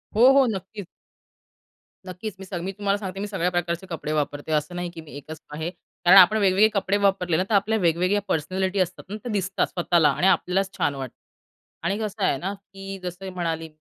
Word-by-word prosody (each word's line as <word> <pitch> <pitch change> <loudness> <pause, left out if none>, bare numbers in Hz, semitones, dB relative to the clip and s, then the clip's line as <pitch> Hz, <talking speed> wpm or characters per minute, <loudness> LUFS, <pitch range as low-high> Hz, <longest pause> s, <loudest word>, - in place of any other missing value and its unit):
हो, 245 +5 +7
हो, 275 -1 +6
नक्कीच. 195 +1 -7 1.2
नक्कीच. 185 +3 -6
मी 195 - -8
सग 180 -2 -5
मी 190 - -3
तुम्हाला 200 0 -1
सांगते, 195 -1 -6
मी 205 - -3
सगळ्या 185 -3 -1
प्रकारचे 175 +1 -2
कपडे 155 -3 -4
वापरते. 145 0 -2
असं 150 +3 0
नाही 175 0 -3
की 165 - -9
मी 155 - -14
एकच 155 +2 -9
आहे 160 +3 -3 0.4
कारण 185 +3 +8
आपण 195 +4 +8
वेगवेगळे 200 +1 +4
कपडे 200 0 +1
वापरले 190 -4 +1
ना, 185 - +2
तर 210 - +3
आपल्या 215 +3 +2
वेगवेगळ्या 180 +4 +2
पर्सनॅलिटी 185 +5 -1
असतात 185 - -1
ना, 210 - -4
त्या 240 +1 -6
दिसतात 190 -2 0
स्वतःला; 170 -3 +2
आणि 175 +6 +1
आपल्यालाच 190 0 +2
छान 140 - 0
वाटतं 130 -3 -6 0.7
आणि 195 +3 +1
कसं 215 -2 -3
आहे 135 - +2
ना, 190 +7 -3
की 195 0 -9
जसं 180 +2 -6
मी 190 - -4
म्हणाली 165 -2 -3
185 Hz, 205 wpm, -24 LUFS, 170-200 Hz, 1.2 s, कारण